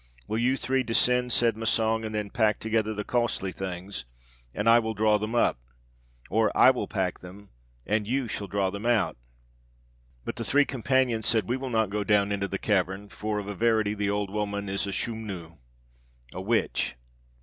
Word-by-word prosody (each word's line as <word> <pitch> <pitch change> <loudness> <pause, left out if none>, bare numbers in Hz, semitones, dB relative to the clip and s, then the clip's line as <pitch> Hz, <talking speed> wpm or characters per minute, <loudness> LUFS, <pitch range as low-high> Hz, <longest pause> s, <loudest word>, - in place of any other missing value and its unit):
'Will 110 - -1
you 130 +3 +2
three 130 +1 0
descend,' 125 +1 +2
said 115 -1 +3
Massang, 110 0 +1
'and 110 0 -4
then 105 -1 -3
pack 110 -3 +2
together 110 -1 0
the 105 -1 -3
costly 120 -5 -1
things, 95 -4 -6 0.5
and 105 - -3
I 115 +1 +7
will 110 -1 -3
draw 105 0 +3
them 110 +3 -3
up, 115 - +2 0.7
or 110 +1 +3
I 130 - +8
will 125 - -3
pack 95 -4 -2
them, 95 +3 -12 0.4
and 105 0 0
you 130 +1 0
shall 105 -2 -4
draw 95 -1 0
them 100 +4 -4
out.' 95 - +2 1.1
But - - -5
the - - -2
three 145 +1 +3
companions 125 -3 +1
said, 110 -5 +2
'We 125 - 0
will 130 0 -5
not 110 -4 +1
go 105 0 -1
down 105 -1 +2
into 100 -1 -1
the 95 - -3
cavern, 95 0 -1
for 105 +1 -3
of 100 -1 -4
a 105 - -3
verity 110 0 +2
the 105 -1 -1
old 100 -1 -1
woman 100 -1 -3
is 100 +1 -1
a - - -3
Schumnu' 95 -7 -5 0.8
(a 90 - -5
witch). 110 +4 0
105 Hz, 190 wpm, -27 LUFS, 100-115 Hz, 1.1 s, I